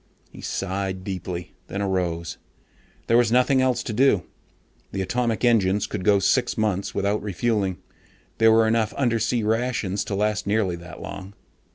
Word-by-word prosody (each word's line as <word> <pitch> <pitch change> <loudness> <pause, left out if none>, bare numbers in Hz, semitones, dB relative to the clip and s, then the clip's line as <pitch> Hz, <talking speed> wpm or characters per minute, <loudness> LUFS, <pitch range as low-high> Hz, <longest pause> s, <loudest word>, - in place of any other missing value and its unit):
He - - -12
sighed 95 -1 -3
deeply, 90 -3 -5 0.2
then 100 - -4
arose. 90 -4 -2 0.7
There 115 - +4
was 120 -2 +3
nothing 125 +2 +4
else 130 -1 +1
to 110 - -4
do. 115 -5 +3 0.7
The 95 0 -2
atomic 120 +3 0
engines 105 -4 +3
could 100 -3 -5
go 100 +1 +5
six 120 +7 +1
months 105 -3 -1
without 100 +2 0
refueling. 100 -1 -1 0.6
There 115 0 +6
were 110 0 +5
enough 110 -1 +1
undersea 115 -2 +1
rations 110 -3 0
to 100 - -3
last 105 +1 0
nearly 100 -4 +1
that 85 +1 -10
long. 100 +1 -8
105 Hz, 155 wpm, -24 LUFS, 95-115 Hz, 0.7 s, There